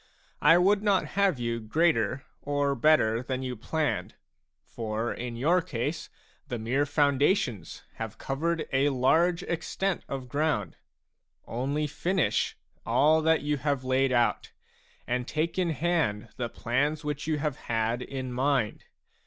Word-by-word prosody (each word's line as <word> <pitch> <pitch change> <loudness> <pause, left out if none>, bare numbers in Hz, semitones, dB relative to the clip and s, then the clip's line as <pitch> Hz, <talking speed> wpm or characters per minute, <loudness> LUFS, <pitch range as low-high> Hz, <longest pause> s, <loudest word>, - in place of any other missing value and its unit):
I 165 +3 +7
would 200 +3 +4
not 200 -3 +2
have 195 -5 +2
you 115 -1 -2
greater 130 0 +1 0.2
or 145 -1 0
better 120 -4 +3
than 130 0 -3
you 125 -1 -3
planned; 115 - -2 0.5
for 110 +1 -3
in 120 -1 -5
your 165 +10 +3
case 145 +2 -3 0.4
the 120 - -3
mere 130 +6 0
foundations 140 - +1
have 110 -1 -5
covered 160 +4 -2
a 135 +2 +3
large 160 +7 +2
extent 180 +2 -2
of 135 -2 -4
ground; 145 - -1 0.7
only 140 +6 -1
finish 150 - 0 0.3
all 155 +2 +4
that 160 0 +2
you 150 0 0
have 140 -1 -1
laid 130 +1 +2
out, 120 -2 +1 0.5
and 125 0 -2
take 165 +4 -1
in 180 -2 +1
hand 150 -9 0
the 120 -2 -3
plans 145 +8 -1
which 150 0 -3
you 155 -1 +1
have 150 -2 -2
had 115 +1 0
in 130 -1 -5
mind. 130 -3 0
140 Hz, 140 wpm, -28 LUFS, 120-160 Hz, 0.7 s, I